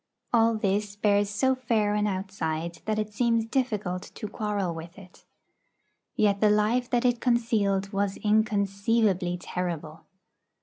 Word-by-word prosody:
All 230 -1 +4
this 205 -1 -1
bears 205 -1 +2
so 260 +6 +2
fair 230 -5 0
an 210 0 +1
outside 170 -4 -3
that 215 0 -1
it 215 0 -3
seems 230 0 +1
difficult 210 -8 -1
to 215 - -5
quarrel 205 -4 -2
with 165 +2 -9
it. 185 -2 -15 0.9
Yet 200 -2 +2
the 215 - +5
life 215 +4 +2
that 245 0 +1
it 245 -1 +2
concealed 215 -5 +1
was 195 0 -1
inconceivably 205 -3 +1
terrible. 170 -3 -5
210 Hz, 135 wpm, -27 LUFS, 195-225 Hz, 0.9 s, the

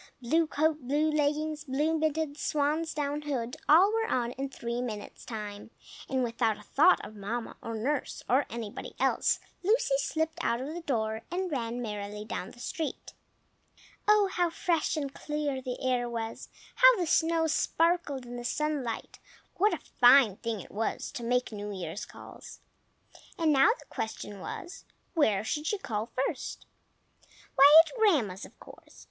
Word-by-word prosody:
Blue 315 +7 +2
coat, 310 0 +1
blue 300 +3 +2
leggings, 300 +1 0
blue 295 +4 0
mittens, 310 -1 -1
swan's 305 +2 0
down 295 0 -2
hood, 255 -5 -3
all 365 +8 +7
were 450 0 +1
on 240 -1 0
in 270 +2 -4
three 235 -2 -4
minutes' 215 -4 -6
time; 210 -2 -6 0.4
and 260 -1 +1
without 230 -2 0
a 210 - -14
thought 310 - +4
of 215 - -11
Mamma 225 +4 -4
or 230 - -5
nurse 265 +6 -2
or 260 +4 +3
anybody 225 -3 -6
else, - - +2 0.2
Lucy 415 - +2
slipped 320 +3 -2
out 235 0 +1
of 275 +5 -5
the 345 - -5
door, 220 -7 -1
and 365 0 -2
ran 240 -3 -2
merrily 210 -1 -5
down 190 - -5
the - - -16
street. 320 +4 -5 0.9
Oh, 420 -1 +5
how 350 -1 +2
fresh 330 -1 0
and 280 -2 -3
clear 295 -3 -3
the 250 -1 -5
air 245 -1 +1
was! 230 -1 -5 0.2
How - - +7
the 360 - 0
snow 325 0 +2
sparkled 320 -3 +1
in 245 0 -7
the 240 - -6
sunlight! 280 -3 -2 0.4
What 415 +4 +3
a - - -14
fine 245 -5 +7
thing 230 -4 -3
it - - -13
was 220 +2 -2
to - - -6
make 250 +1 0
New 205 -1 -5
Year's 185 -1 -5
calls! - - -12 0.8
And 320 -3 +3
now 270 0 +6
the - - -16
question 210 -2 -5
was, 350 - -7 0.3
where 220 - +2
she 295 +7 -2
should 395 +5 -2
call 215 -1 -2 0.2
first. - - -5 0.9
Why, 290 +4 +9
at - - -10
Grandma's, 255 - +2
of - - -17
course! - - -15
275 Hz, 165 wpm, -29 LUFS, 230-315 Hz, 0.9 s, Why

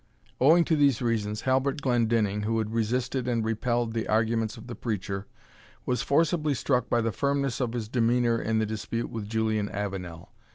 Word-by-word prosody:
Owing 165 +6 +6
to 160 - +2
these 140 -5 +3
reasons, 110 -3 -1
Halbert 135 +3 +1
Glendinning, 115 -5 +1
who 110 +2 0
had 110 0 -2
resisted 125 +3 -1
and 115 -3 0
repelled 120 +1 0
the 115 -1 -2
arguments 110 +1 +1
of 110 - -11
the 120 - -7
preacher, 100 -4 -4 0.6
was 125 - 0
forcibly 155 0 +2
struck 125 -1 0
by 120 - +2
the 115 0 0
firmness 140 0 -1
of 120 -2 -1
his 115 -3 -3
demeanour 120 0 +2
in 110 0 0
the 110 - +2
dispute 110 +2 -4
with 110 -3 -5
Julian 110 -2 0
Avenel. 95 -4 -5
115 Hz, 175 wpm, -27 LUFS, 110-125 Hz, 0.6 s, Owing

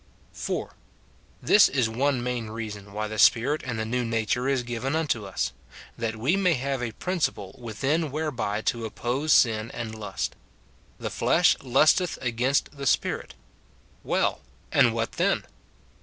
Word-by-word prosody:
4. - - -4 0.7
This 205 - +6
is 130 -4 +1
one 125 +2 0
main 125 -2 -2
reason 105 -2 -7
why 105 +1 -3
the 110 0 -5
Spirit 140 +6 +4
and 120 -3 -4
the 110 - -2
new 125 +2 -1
nature 115 +2 0
is 135 -2 +1
given 120 +4 -2
unto 145 -10 0
us, 95 - -2 0.2
— - - -13
that 115 -1 -3
we 130 - +1
may 185 -4 +3
have 135 0 -2
a 120 -2 -3
prin 185 - -3
ciple 100 - -2
within 135 +8 -1
whereby 130 -9 -2
to 115 +1 -1
oppose 125 +7 -2
sin 115 -3 +4
and 115 -2 -5
lust. 110 -2 -4 0.3
" - - -32 0.2
The - - -4
flesh - - +3
lusteth 150 +7 +3
against 125 +4 0
the 140 -1 -3
spirit." - - 0 0.7
Well! - - 0 0.3
and - - +5
what - - -1
then? - - 0
120 Hz, 160 wpm, -26 LUFS, 110-140 Hz, 0.7 s, This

